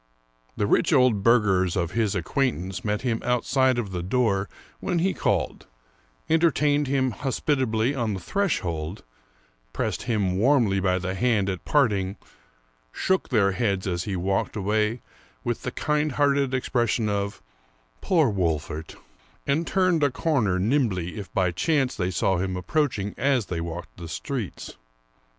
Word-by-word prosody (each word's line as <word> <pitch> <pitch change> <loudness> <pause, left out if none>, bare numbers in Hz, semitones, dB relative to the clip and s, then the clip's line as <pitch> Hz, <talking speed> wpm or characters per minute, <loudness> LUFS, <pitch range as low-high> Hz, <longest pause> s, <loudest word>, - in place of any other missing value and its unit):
The 105 - +1
rich 105 - +2
old 125 -8 +4
burghers 95 -6 +3
of 85 -2 -1
his 110 -2 0
acquaintance 95 - -1
met 105 +2 -1
him 115 -3 -1
out 125 -1 0
side 130 -2 +3
of 110 -5 -3
the 90 -2 -3
door 100 -1 0 0.3
when 175 - -1
he 190 +3 +1
called, - - -1 0.6
entertained 150 -3 +2
him 130 -1 +1
hospitably 130 -2 0
on 115 -6 -1
the - - -5
threshold, 90 - -2 0.7
pressed - - -2
him 100 -6 0
warmly 115 -5 +3
by 90 -1 +1
the 95 0 -3
hand 105 -2 +1
at 95 - -7
part 140 -7 +3
ing, 95 0 -2 0.8
shook 190 - 0
their 100 -6 +3
heads 100 -2 -1
as 85 -2 -2
he 100 - -2
walked 95 +2 -1
away, 105 +3 0 0.4
with - - -2
the - - -4
kind 150 -1 0
hearted 140 -1 +2
expression 120 -3 0
of 100 -1 -2 0.3
" - - -38
poor 165 -6 +3
Wolfert," 80 -4 -2 0.5
and 155 +4 0
turned 185 -4 +2
a 145 - +4
corner 125 - +1
nimbly 100 - 0
if 100 - -8
by 90 -2 +1
chance 135 - +1
they 90 -3 -1
saw 95 +1 +1
him 95 +1 -2
approaching 110 - -1
as 135 -4 +2
they 85 -3 -3
walked 85 +1 -7
the 85 -2 -7
streets. 120 +4 -5
110 Hz, 155 wpm, -25 LUFS, 95-135 Hz, 0.8 s, old